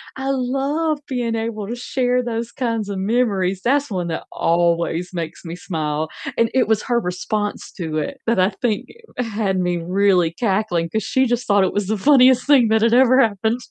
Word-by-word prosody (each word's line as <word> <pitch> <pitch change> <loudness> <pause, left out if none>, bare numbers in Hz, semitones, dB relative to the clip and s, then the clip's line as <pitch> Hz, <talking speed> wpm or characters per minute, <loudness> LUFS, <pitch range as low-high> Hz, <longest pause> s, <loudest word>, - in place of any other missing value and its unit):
I 265 +1 -4
love 275 +4 -1
being 240 -3 -2
able 225 -2 -4
to 235 - -4
share 250 0 0
those 235 -1 -4
kinds 230 -5 -2
of 200 - -3
memories. 195 -3 0
That's 280 +3 +1
one 180 -3 -2
that 165 -1 -4
always 170 +1 0
makes 165 -2 -6
me 165 0 -6
smile, 155 -3 -3 0.3
and 230 -1 +3
it 260 0 +2
was 220 -1 +1
her 240 -2 +1
response 205 +2 -3
to 160 -4 -4
it 150 - -3
that, 230 -4 +2
I 185 +1 +4
think, 220 -5 -1 0.3
had 215 -5 -1
me 180 -1 0
really 180 0 +2
cackling 190 -4 -1
'cause 220 +2 -2
she 260 0 +1
just 240 0 -1
thought 200 -1 +4
it 190 - 0
was 205 -2 -1
the 215 +1 0
funniest 255 +1 +5
thing 275 -5 +5
that 220 0 +3
had 230 +1 +3
ever 255 +1 +5
happened. 220 +2 0
220 Hz, 195 wpm, -20 LUFS, 180-245 Hz, 0.3 s, funniest